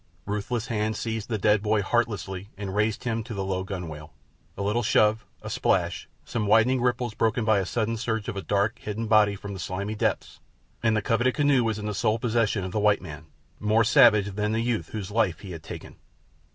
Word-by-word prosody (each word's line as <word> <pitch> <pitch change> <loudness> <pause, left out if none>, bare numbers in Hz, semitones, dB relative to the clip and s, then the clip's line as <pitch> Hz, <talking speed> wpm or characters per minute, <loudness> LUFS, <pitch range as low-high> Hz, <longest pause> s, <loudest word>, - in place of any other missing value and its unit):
Ruthless 105 +3 -2
hands 110 -1 -1
seized 110 -1 -4
the 110 - 0
dead 105 0 +3
boy 105 -1 +1
heartlessly 100 -4 -1
and 100 -1 -5
raised 105 0 0
him 115 -2 -1
to 115 -1 -7
the 95 - -2
low 95 -1 -1
gunwale. 85 -5 -7 0.5
A 100 - -2
little 105 +4 +1
shove, 110 0 +2 0.2
a - - -5
splash, - - 0 0.2
some 110 -3 -2
widening 115 +4 +4
ripples 125 -1 0
broken 110 +1 0
by 110 -2 +4
the 95 - -2
sudden 115 +2 -1
surge 110 -2 -2
of 115 - -3
a 100 - -3
dark, 100 +4 0
hidden 110 +2 -4
body 105 -2 +4
from 100 0 -7
the 95 - -7
slimy 95 +6 -3
depths, 105 - -2 0.4
and 110 -1 +2
the 105 - -1
coveted 120 +4 +1
canoe 145 -4 +3
was 110 -2 -1
in 105 - -5
the 105 - -2
sole 110 +2 +1
possession 115 -3 0
of 95 - -5
the 105 - -1
white 105 -1 +3
man—more 90 +8 -2
savage 105 -2 +5
than 105 +2 -1
the 110 - +1
youth 115 -9 -1
whose 105 -3 -5
life 105 -5 +1
he 95 - -8
had 80 -2 -7
taken. - - -9
105 Hz, 210 wpm, -26 LUFS, 100-115 Hz, 0.5 s, savage